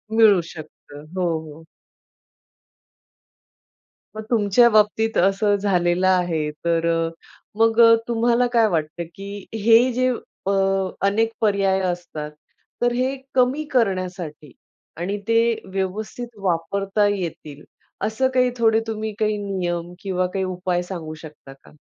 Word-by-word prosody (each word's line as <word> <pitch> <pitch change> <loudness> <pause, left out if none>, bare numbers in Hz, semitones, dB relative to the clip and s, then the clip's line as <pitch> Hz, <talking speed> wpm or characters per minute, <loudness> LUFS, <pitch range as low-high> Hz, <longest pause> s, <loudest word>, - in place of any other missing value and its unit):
मिळू 215 -5 +6
शकतं. 150 -2 -12
हो, 185 - -1 0.3
हो. 155 +2 -12 2.5
मग 215 - -6
तुमच्या 230 +1 +4
बाबतीत 215 +1 +2
असं 195 +3 +3
झालेलं 185 -2 +1
आहे 175 -5 +1 0.2
तर 165 -1 +1 0.7
मग 225 0 +3 0.3
तुम्हाला 240 +1 +2
काय 230 -2 +4
वाटतं 165 -1 -2
की 200 0 -8
हे 225 +3 +4
जे 255 +1 +1 0.4
अ, - - +2 0.6
अनेक 225 +3 +1
पर्याय 200 -3 +2
असतात, 155 -4 -7 0.5
तर 240 0 +3
हे 255 +2 0 0.2
कमी 260 +4 +2
करण्यासाठी 185 - -2 0.5
आणि 185 +5 -3
ते 230 0 +4 0.3
व्यवस्थित 215 +5 -4
वापरता 195 +3 0
येतील 155 -5 -7 0.4
असं 220 +5 +1
काही 255 -1 +3
थोडे 225 -1 +3
तुम्ही 220 -1 -4
काही 215 -1 +1
नियम 175 -4 -3
किंवा 185 -1 -1
काही 195 - -1
उपाय 180 -1 -2
सांगू 170 -4 -6
शकता 150 -3 -12
का? - - -18
195 Hz, 120 wpm, -22 LUFS, 175-225 Hz, 2.5 s, मिळू